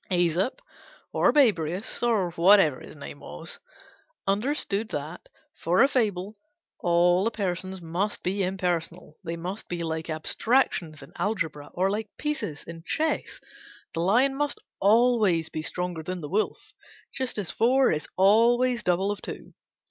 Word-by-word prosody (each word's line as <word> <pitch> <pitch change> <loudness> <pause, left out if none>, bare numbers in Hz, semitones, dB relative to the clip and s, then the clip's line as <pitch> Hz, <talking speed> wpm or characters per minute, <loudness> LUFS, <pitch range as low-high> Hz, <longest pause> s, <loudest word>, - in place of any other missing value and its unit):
Æsop, 175 - +1 0.6
or - - +4
Babrius 195 - +1
(or 220 -7 +1
whatever 170 -4 +5
his - - -12
name 145 0 -9
was), 75 +1 -8 0.7
understood 215 0 0
that, 150 +2 -6 0.3
for 180 +6 +4
a - - +6
fable, 210 -7 -1 0.4
all 175 +1 +3
the 225 - +2
persons 190 -3 -3
must 180 +6 -2
be 195 +3 -1
impersonal. 180 -4 -2
They 170 -1 -4
must 180 +5 -6
be 175 -1 -3
like 160 0 -3
abstractions 165 - 0
in - - -15
algebra, 160 -9 -2
or 190 +2 +2
like 215 +2 -3
pieces 295 - -3
in 165 -1 -9
chess. 310 - -1 0.5
The - - -3
lion 240 +10 +3
must 290 +1 -1 0.2
always 210 -6 +3
be 155 - -4
stronger 180 0 -3
than 180 +2 -5
the 150 - -6
wolf, 210 +4 -2 0.4
just 260 -3 -3
as 195 -6 -2
four 260 +3 +3
is 155 -1 -2
always 235 +5 +4
double 190 +1 +1
of 205 - -5
two. - - -8
190 Hz, 145 wpm, -26 LUFS, 170-220 Hz, 0.7 s, a